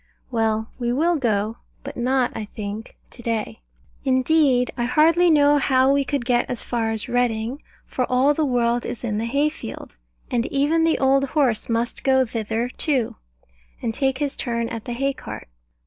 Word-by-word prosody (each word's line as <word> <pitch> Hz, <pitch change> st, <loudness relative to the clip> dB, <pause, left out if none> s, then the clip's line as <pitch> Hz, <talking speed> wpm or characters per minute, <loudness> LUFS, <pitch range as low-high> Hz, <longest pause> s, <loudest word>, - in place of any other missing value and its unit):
Well, 220 Hz, -1 st, 0 dB
we 240 Hz, -1 st, 0 dB
will 330 Hz, +7 st, +2 dB
go: 220 Hz, -5 st, 0 dB, 0.3 s
but -, -, -7 dB
not, 255 Hz, +1 st, +1 dB
I 215 Hz, -, -4 dB
think, 210 Hz, +1 st, -7 dB
to 240 Hz, -, -9 dB
day. 225 Hz, -1 st, -3 dB, 0.4 s
Indeed 260 Hz, -1 st, +3 dB
I 240 Hz, -, -1 dB
hardly 325 Hz, +7 st, +4 dB
know 290 Hz, -2 st, +5 dB
how 265 Hz, 0 st, +3 dB
we 280 Hz, 0 st, +2 dB
could 270 Hz, -2 st, -2 dB
get 245 Hz, -1 st, +1 dB
as 245 Hz, -, -2 dB
far 230 Hz, -2 st, -1 dB
as 220 Hz, -1 st, -3 dB
Reading; 245 Hz, +1 st, -1 dB, 0.2 s
for 255 Hz, -, -1 dB
all 260 Hz, +3 st, +4 dB
the 315 Hz, -, 0 dB
world 240 Hz, -3 st, +1 dB
is 240 Hz, -, -6 dB
in 215 Hz, -3 st, -1 dB
the 225 Hz, -, -2 dB
hay 280 Hz, +5 st, +1 dB
field, 310 Hz, -, -9 dB, 0.3 s
and 240 Hz, -2 st, +1 dB
even 300 Hz, +4 st, +2 dB
the 325 Hz, -, +2 dB
old 270 Hz, +1 st, +3 dB
horse 260 Hz, -7 st, 0 dB
must 230 Hz, +1 st, -1 dB
go 265 Hz, -1 st, +4 dB
thither 225 Hz, 0 st, -2 dB
too, 260 Hz, -3 st, -1 dB, 0.6 s
and 225 Hz, -, -2 dB
take 265 Hz, +1 st, 0 dB
his 285 Hz, -1 st, -2 dB
turn 235 Hz, -1 st, -2 dB
at 225 Hz, -2 st, -6 dB
the 240 Hz, -, -4 dB
hay 275 Hz, +3 st, 0 dB
cart. -, -, -9 dB
250 Hz, 180 wpm, -23 LUFS, 230-275 Hz, 0.6 s, know